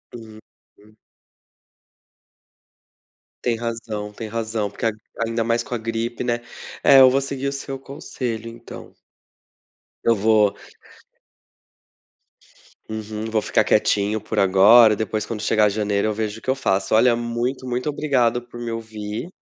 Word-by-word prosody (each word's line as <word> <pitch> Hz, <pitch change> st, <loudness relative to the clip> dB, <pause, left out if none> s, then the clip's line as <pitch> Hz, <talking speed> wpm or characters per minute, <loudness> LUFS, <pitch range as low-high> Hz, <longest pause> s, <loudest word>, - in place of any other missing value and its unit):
Uhum. 110 Hz, -1 st, -16 dB, 2.5 s
Tem 120 Hz, -2 st, +1 dB
razão, 115 Hz, -2 st, -5 dB
tem 110 Hz, +2 st, -7 dB
razão. 110 Hz, -1 st, -2 dB
Porque 105 Hz, -, -6 dB
a 115 Hz, -, +3 dB, 0.3 s
ainda 115 Hz, 0 st, -1 dB
mais 115 Hz, +1 st, 0 dB
com 120 Hz, -, -5 dB
a -, -, -1 dB
gripe, 115 Hz, +2 st, -3 dB
né. 120 Hz, -1 st, -1 dB, 0.4 s
É, 135 Hz, -1 st, +8 dB
eu 130 Hz, -, +9 dB
vou 135 Hz, +2 st, +1 dB
seguir 135 Hz, 0 st, -4 dB
o -, -, -1 dB
seu 135 Hz, -1 st, -6 dB
conselho, 125 Hz, -4 st, -6 dB
então. 115 Hz, 0 st, -11 dB, 1.1 s
Eu 115 Hz, -, +3 dB
vou 105 Hz, -1 st, +3 dB, 2.3 s
Uhum. 110 Hz, 0 st, -5 dB
Vou 110 Hz, -1 st, +1 dB
ficar -, -, +2 dB
quietinho 105 Hz, +1 st, +1 dB
por -, -, -6 dB
agora. 105 Hz, +4 st, +6 dB
Depois, 110 Hz, 0 st, -2 dB
quando 110 Hz, -1 st, -5 dB
chegar 105 Hz, -1 st, +3 dB
janeiro, 105 Hz, 0 st, 0 dB
eu 110 Hz, -, 0 dB
vejo 110 Hz, 0 st, -3 dB
o -, -, -27 dB
que -, -, -6 dB
eu 130 Hz, -, +3 dB
faço. 95 Hz, -7 st, 0 dB
Olha 120 Hz, +2 st, +5 dB
muito, 120 Hz, +3 st, -3 dB
muito 125 Hz, +4 st, -2 dB
obrigado 130 Hz, -5 st, +1 dB
por 120 Hz, 0 st, -12 dB
me 120 Hz, -1 st, -4 dB
ouvir 110 Hz, +2 st, -6 dB
115 Hz, 140 wpm, -22 LUFS, 110-120 Hz, 2.5 s, eu